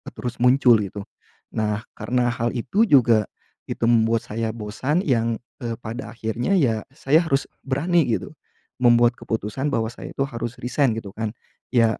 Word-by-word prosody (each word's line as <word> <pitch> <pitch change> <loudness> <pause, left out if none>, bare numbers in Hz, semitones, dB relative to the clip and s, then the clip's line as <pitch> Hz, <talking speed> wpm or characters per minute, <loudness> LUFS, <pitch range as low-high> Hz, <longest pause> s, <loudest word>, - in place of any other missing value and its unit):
terus 125 - -5
muncul 125 -1 +6
gitu. 100 0 -5 0.5
Nah 105 0 -1
karena 125 -1 +1
hal 120 0 -1
itu 135 - +2
juga 115 -6 +5 0.4
itu - - -1
membuat 115 -1 +3
saya 110 +1 -2
bosan 130 - -1
yang, 115 -4 +1 0.3
eee, 115 -1 -2
pada 115 +1 -6
akhirnya 115 - -2
ya 115 -9 +1
saya 140 +3 +3
harus 140 -3 +1 0.2
berani 155 +4 +2
gitu, 115 - -1 0.5
membuat 120 0 +5
keputusan 110 +5 -3
bahwa 110 -3 0
saya - - -9
itu 135 - 0
harus 120 -2 -5
resign 130 0 +2
gitu 105 -3 -6
kan. 110 -1 -3 0.4
Ya 115 -3 +3
120 Hz, 155 wpm, -23 LUFS, 110-130 Hz, 0.5 s, muncul